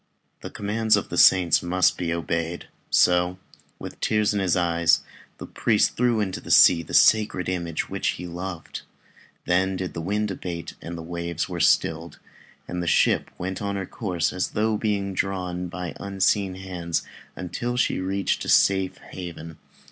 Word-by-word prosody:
The - - -7
commands 110 +2 +1
of - - -4
the - - -4
saints 90 -3 +6
must 90 +1 +2
be 85 -2 -3
obeyed, 85 +1 -3 0.2
so 90 +1 +3 0.4
with - - -9
tears 105 -1 +1
in 105 - 0
his 95 -3 +1
eyes, 85 -1 +2 0.4
the - - -8
priest 110 -3 +1
threw 120 -2 +2
into 95 -3 -2
the - - -11
sea 85 - +7
the 80 - -5
sacred 105 -4 +4
image 85 -3 -2
which - - -3
he 90 - -7
loved. 85 0 -6 0.6
Then 95 +2 +1
did 95 -1 -4
the 85 - -5
wind 105 +4 -1
abate, 85 -3 -6
and 85 0 -7
the 80 - -7
waves 85 -1 -4
were 90 -2 -5
stilled, 80 0 +1 0.5
and 90 0 -4
the 85 - -4
ship - - +2
went 95 +1 -4
on 100 -1 -2
her 95 -1 -3
course 90 -5 -2
as 95 - -1
though 110 +1 0
she - - 0
were - - 0
being 100 -3 -1
drawn 90 -2 -2
by 90 0 -6
unseen 95 -1 0
hands 90 -3 -3 0.3
until 120 +7 -4
she 125 - +1
reached 95 +1 -1
a - - -5
safe 95 -1 +3
haven. 80 -3 -8
90 Hz, 175 wpm, -24 LUFS, 85-100 Hz, 0.6 s, sea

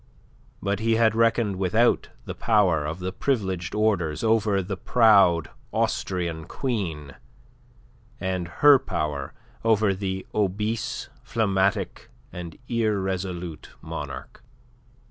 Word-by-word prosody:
But 100 0 0
he 115 0 +2
had 110 -1 +4
reckoned 115 -3 +2
without 110 +6 +2 0.2
the - - -5
power 95 -9 +2
of 80 +2 -4
the 90 0 -4
privileged 95 -7 -1
orders 95 -7 +1
over 110 -3 +2
the 95 +2 -4
proud 95 - +4 0.2
Austrian 85 -4 -1
queen, 85 - -3 1.1
and 95 -1 -2
her 140 +11 +6
power 75 - -3 0.3
over 110 -3 +3
the 95 0 -4
obese, 105 +2 -1
phlegmatic, 100 -2 0 0.6
irresolute 95 - -2
monarch. - - -7
95 Hz, 100 wpm, -25 LUFS, 90-110 Hz, 1.1 s, her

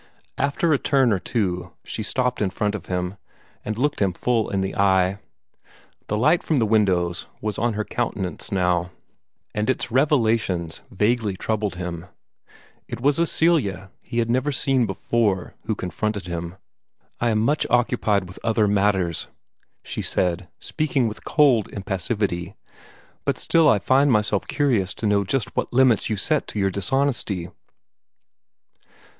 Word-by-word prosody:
After 145 +3 +1
a 140 - +2
turn 135 -5 +3
or 95 - 0
two 90 -5 -2
she - - -5
stopped 125 +3 0
in 100 - +2
front 105 +2 -1
of 100 -4 -6
him, 90 +1 -2 0.5
and 110 0 -4
looked 145 0 0
him 95 -3 +2
full 115 +3 0
in 100 -1 0
the 95 0 -3
eye. 95 0 +2 0.9
The 105 - -1
light 155 +10 +3
from 155 - 0
the 115 - +3
windows 95 -5 +1
was 105 -1 -3
on 120 0 +1
her 105 0 -2
countenance 100 -6 -3
now, 90 -2 +1 0.6
and 105 +3 -1
its 130 - -1
revelations 115 - +1
vaguely 105 -1 0
troubled 105 -2 -2
him. 90 -1 -5 0.8
It - - -6
was 140 +4 +2
a 170 - +3
Celia 100 - +1
he 120 - -7
had 115 -1 +2
never 130 +5 +1
seen 130 -3 +1
before 100 -1 0
who 110 0 -1
confronted 105 +1 -3
him. 85 0 -5 0.6
"I 120 - +1
am 110 - +2
much 140 +8 +1
occupied 115 -5 +2
by 90 - -10
other 110 -2 +2
matters," 95 -4 +1 0.6
she - - -4
said, 90 0 -1
speaking 140 - 0
with 110 - -7
cold 135 -9 +4
impassivity, 95 -1 -3 0.7
"but - - 0
still 165 -1 +4
I - - +5
find 130 +8 +3
myself 105 -3 +1
curious 120 -11 +1
to - - -4
know 105 -1 +3
just 120 +4 -2
what - - -1
limits 125 -3 +3
you 110 - -1
set 150 +9 0
to 105 - -4
your 95 -1 +1
dishonesty." 100 -4 -1
105 Hz, 155 wpm, -23 LUFS, 95-125 Hz, 0.9 s, I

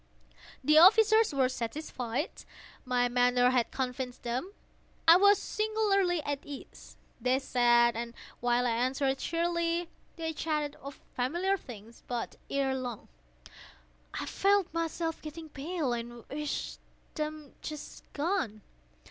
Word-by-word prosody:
The 305 +3 +6
officers 440 +4 +7
were 270 -3 +2
satisfied. 255 +1 -3 0.5
My 245 -1 +2
manner 245 0 +3
had 245 -3 +2
convinced 255 -1 -4
them. 250 +11 -3 0.6
I 330 - +10
was 405 +2 +6
singularly 405 -5 +1
at 285 -1 -2
ease. 285 -2 -11 0.2
They 250 +2 +3
sat, 240 -3 +3
and 235 +1 -5 0.2
while 245 0 +2
I 240 - +2
answered 265 +3 0
cheerily, 340 0 0 0.3
they 325 -1 -3
chatted 300 -2 -1
of 280 +1 -10
familiar 345 +10 0
things. 230 - -11
But, 240 -2 -3
ere 275 -1 +1
long, 250 -4 -5 1.1
I - - -3
felt 395 -3 +2
myself 330 0 -2
getting 315 +1 -8
pale 295 -2 -2
and 235 0 -6
wished 300 +1 -4 0.3
them 305 -2 -5 0.6
gone. 290 - -1
280 Hz, 120 wpm, -30 LUFS, 245-335 Hz, 1.1 s, I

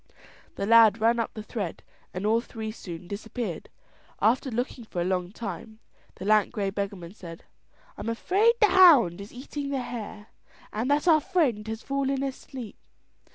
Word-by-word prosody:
The 200 - -2
lad 225 -1 +6
ran 230 +2 +3
up 230 - -3
the 215 - -6
thread 205 -6 -5 0.3
and 185 +3 -4
all 225 +2 +3
three 220 -2 -6
soon 175 -5 -9
disappeared. 215 -1 -5 0.5
After 250 +4 +2
looking 245 0 -3
up - - -33
for 175 - -3
a - - +1
long 180 -1 -1
time, 220 0 -7 0.4
the - - -8
lank 215 0 +3
grey 200 -4 -2
beggarman 195 -3 -5
said: 170 -5 -11 0.6
"I'm - - -3
afraid 395 - +2
the 425 - +6
hound 265 - +6
is 200 - -10
eating 280 +3 -6
the 270 -2 -2
hare, 215 -3 -7 0.4
and 225 +5 -2
that 290 +4 +2
our 315 -3 +6
friend 250 - 0
has 220 +1 -5
fallen 275 0 -1
asleep." 265 -3 -7
225 Hz, 170 wpm, -27 LUFS, 200-260 Hz, 0.6 s, lad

